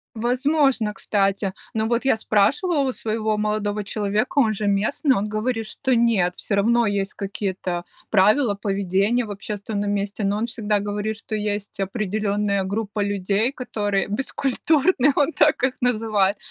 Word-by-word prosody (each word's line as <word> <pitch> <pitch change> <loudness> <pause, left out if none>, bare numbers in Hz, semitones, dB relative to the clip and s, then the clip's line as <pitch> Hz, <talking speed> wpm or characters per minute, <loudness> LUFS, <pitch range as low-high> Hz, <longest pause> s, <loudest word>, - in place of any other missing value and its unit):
Возможно, 250 -1 +1
кстати. 195 -2 0 0.2
Но 220 0 0
вот 235 +2 0
я 265 - +3
спрашивала 280 - +2
у 255 - -1
своего 220 -1 -1
молодого 210 -1 -1
человека, 210 +6 -1
он 220 -4 +3
же 210 0 -3
местный, 220 +7 +2
он 200 - 0
говорит, 220 +2 -2
что 260 +4 -1
нет, 220 -7 +2
всё 200 - -2
равно 235 +3 +3
есть 200 0 -1
какие-то 190 -3 -3 0.3
правила 210 +3 +4
поведения 200 +4 0
в 210 - -9
общественном 205 0 -4
месте. 200 +1 -2
Но 200 +1 +1
он 230 - -1
всегда 210 -3 -1
говорит, 205 +1 -3
что 220 0 -5
есть 205 -1 -3
определенная 200 0 -1
группа 210 +1 -3
людей, 200 +5 0
которые 205 -7 -2
бескультурны, 275 - +1
он 290 +3 +2
так 300 -4 +3
их 260 0 +2
называет. 215 -5 +1
215 Hz, 150 wpm, -23 LUFS, 200-235 Hz, 0.3 s, правила